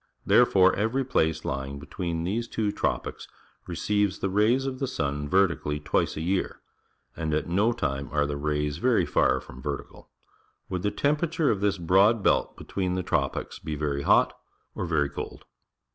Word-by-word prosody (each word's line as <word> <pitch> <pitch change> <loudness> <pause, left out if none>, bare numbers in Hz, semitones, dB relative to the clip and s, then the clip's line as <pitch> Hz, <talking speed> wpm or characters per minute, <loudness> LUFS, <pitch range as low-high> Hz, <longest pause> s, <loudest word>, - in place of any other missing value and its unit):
There - - +6
fore 95 -1 +4
every 115 +6 0
place 80 -10 0
lying 70 0 -3
between 85 +3 -4
these 110 +7 -2
two 105 -3 -1
tropics - - -3 0.4
receives 100 +2 0
the 100 - -2
raj 105 +4 +4
s - - -5
of 130 -1 -4
the 135 - -1
sun 75 - -2
verti 95 -4 +3
cally 75 0 -2
twice 75 - 0
a - - -3
year, 90 +3 -1 0.6
and 80 -2 -1
at 75 - -1
no 100 +7 +2
time 70 - -2
are 75 -1 +2
the 75 0 -3
rays 75 0 -1
verj^ - - +2
far 65 +1 +3
from 65 0 -12
^•ertical. 70 0 -6 0.6
Would 90 -1 -2
the 105 - +1
temperature 150 +6 +1
of 100 - -2
this 100 -1 +1
broad 95 +5 +4
belt - - +2
between 90 -2 -2
the 90 - -1
tropics - - -2
be 75 - -4
very 70 -1 -2
hot - - +4 0.4
or 90 - -4
very 75 -4 +2
cold? - - -7
90 Hz, 180 wpm, -27 LUFS, 75-105 Hz, 0.6 s, There